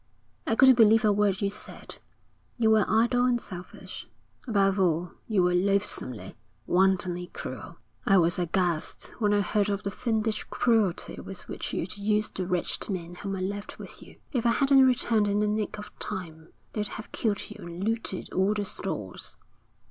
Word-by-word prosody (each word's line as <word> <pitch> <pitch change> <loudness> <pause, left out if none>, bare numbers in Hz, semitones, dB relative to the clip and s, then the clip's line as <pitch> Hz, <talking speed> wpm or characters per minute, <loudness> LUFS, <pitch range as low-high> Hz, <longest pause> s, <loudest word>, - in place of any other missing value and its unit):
'I 225 - +2
couldn't 260 0 +7
believe 220 0 +6
a 210 - +5
word 200 -1 +1
you 200 - +2
said. 210 - -8 0.6
You 225 -2 +3
were 215 -2 +5
idle 235 +3 +3
and 245 -1 +2
selfish. 180 -4 -9 0.4
Above 200 -3 +2
all 175 -1 +1 0.2
you 205 -5 +2
were 180 0 +3
loathsomely, 185 - 0 0.3
wantonly 180 -1 +2
cruel. - - -8 0.3
I 195 - +4
was 175 0 +3
aghast 175 -2 -1
when 210 -2 +2
I 205 0 +3
heard 205 0 +1
of 200 0 -2
the 200 - -2
fiendish 220 0 -1
cruelty 220 -7 0
with 195 -2 -9
which - - -5
you'd 185 +5 -3
used 210 +1 0
the 185 -2 -2
wretched 180 +3 -1
men 175 -3 -4
whom 195 +2 -5
I 185 - -4
left 200 +2 -4
with - - -10
you. - - -14 0.2
If 245 -5 0
I 235 -1 +3
hadn't 270 0 +5
returned 235 -4 +2
in 205 0 +1
the 210 - +2
nick 210 0 -1
of 210 0 -9
time, 160 -3 -6 0.2
they'd 210 -1 -2
have 215 - -8
killed 210 -3 -2
you - - -10
and 170 +2 -6
looted 225 -2 -2
all 195 +3 +2
the 205 -1 -1
stores.' - - -6
205 Hz, 180 wpm, -27 LUFS, 185-220 Hz, 0.6 s, couldn't